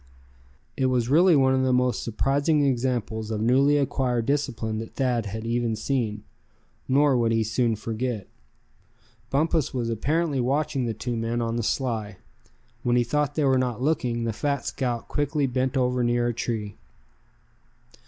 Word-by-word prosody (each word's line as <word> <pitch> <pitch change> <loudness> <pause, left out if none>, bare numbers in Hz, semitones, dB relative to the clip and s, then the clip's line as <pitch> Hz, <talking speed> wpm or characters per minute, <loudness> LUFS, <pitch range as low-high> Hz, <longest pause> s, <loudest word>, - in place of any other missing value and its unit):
It 130 - +1
was 125 -2 0
really 170 +4 +5
one 130 -2 +4
of 130 - +2
the 130 0 +2
most 125 0 +1
surprising 140 +6 +1
examples 120 -4 -1
of 110 -1 -2
newly 135 +6 +3
acquired 125 -4 0
discipline 120 -6 -1
that 115 - -8
Thad 125 -5 0
had 110 +3 -5
even 115 -1 0
seen. 110 -3 -2 0.6
Nor 140 +1 +4
would 115 -2 +2
he 115 0 +2
soon 115 +1 0
forget 115 +1 -3
it. - - -24 1.0
Bumpus 155 0 0
was 115 -2 -1
apparently 150 +5 0
watching 135 0 0
the 115 - -3
two 120 +3 -3
men 115 +1 -2
on 115 -1 -1
the 120 - 0
sly. 110 -5 -2 0.6
When 120 0 +1
he 120 - +4
thought 145 +4 -1
they 150 - +1
were 130 -1 +3
not 125 -3 -1
looking, 125 -6 0
the 115 -1 -1
fat 140 +5 -2
scout 120 -4 -2
quickly 145 0 0
bent 130 +1 -1
over 125 -1 +1
near 120 0 +1
a - - -1
tree. 110 -2 -4
125 Hz, 165 wpm, -25 LUFS, 115-135 Hz, 1.0 s, really